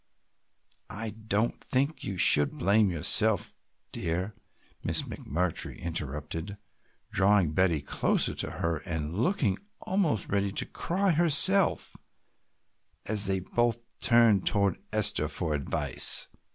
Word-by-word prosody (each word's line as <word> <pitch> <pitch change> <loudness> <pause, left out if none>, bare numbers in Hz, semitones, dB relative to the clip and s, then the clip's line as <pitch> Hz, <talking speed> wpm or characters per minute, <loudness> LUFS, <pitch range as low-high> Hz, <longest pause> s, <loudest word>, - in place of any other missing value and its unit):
"I 105 +3 -6
don't 110 +1 -3
think 140 +5 -2
you 95 - -5
should 75 -4 +5
blame 100 +3 +2
yourself, 95 +4 +1 0.4
dear," 90 +5 -4 0.5
Miss - - -1
McMurtry 85 +2 -3
interrupted, 80 +4 -4 0.5
drawing 95 -4 +2
Betty 85 -2 0
closer - - +1
to - - -2
her 85 -1 -3
and 80 -2 -5
looking 120 - -1 0.2
almost 180 - -1
ready 100 0 -1
to - - 0
cry 190 +2 -2
herself 175 +4 +3 1.1
as 105 -1 0
they 95 -1 -1
both 120 +4 -1 0.2
turned 115 -5 +3
toward 100 -4 +1
Esther - - +1
for 80 -3 -2
advice. 70 -2 +4
100 Hz, 110 wpm, -27 LUFS, 85-115 Hz, 1.1 s, should